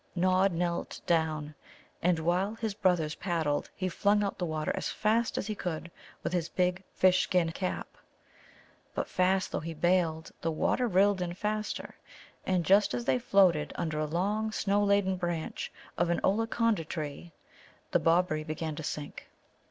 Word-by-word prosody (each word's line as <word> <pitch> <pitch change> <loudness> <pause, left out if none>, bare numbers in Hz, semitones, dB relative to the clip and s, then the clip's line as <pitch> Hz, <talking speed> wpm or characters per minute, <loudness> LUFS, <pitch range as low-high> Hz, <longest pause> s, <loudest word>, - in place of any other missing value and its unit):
Nod 185 +2 +3
knelt 170 0 -2
down, 155 -3 0 0.5
and, 175 0 +3
while 180 +6 0
his 225 -2 -3
brothers 180 -6 +1
paddled, 160 -6 -1
he 185 - -2
flung 205 +3 +2
out 200 - -3
the 175 - -1
water 155 -1 -1
as - - -2
fast 225 +2 +1
as - - -1
he 215 - -2
could 170 -4 -4 0.3
with - - -2
his 170 -2 0
big 180 +1 0
fish 185 0 +5
skin 175 -3 +1
cap. 185 +2 -3 1.1
But - - -1
fast 185 +1 +1
though - - -1
he 165 0 -6
baled, 165 -1 +1
the 165 - 0
water 240 +9 +1
rilled 200 -1 +3
in 175 -1 -3
faster, 215 +2 -3 0.5
and 180 -3 +1
just 200 -7 +4
as 120 -1 -3
they 130 -1 +2
floated 180 -5 +3
under 155 -2 -2
a 155 - +1
long, 205 +7 0
snow 205 -1 +1
laden 200 -2 +2
branch 175 -3 -3 0.3
of 175 - +2
an 170 - +1
Ollaconda 225 -1 +1
tree, 155 +1 -5 0.6
the - - +4
Bobberie 165 -2 +2
began 155 0 -4
to 160 - -5
sink. 150 0 -6
180 Hz, 165 wpm, -30 LUFS, 160-195 Hz, 1.1 s, fish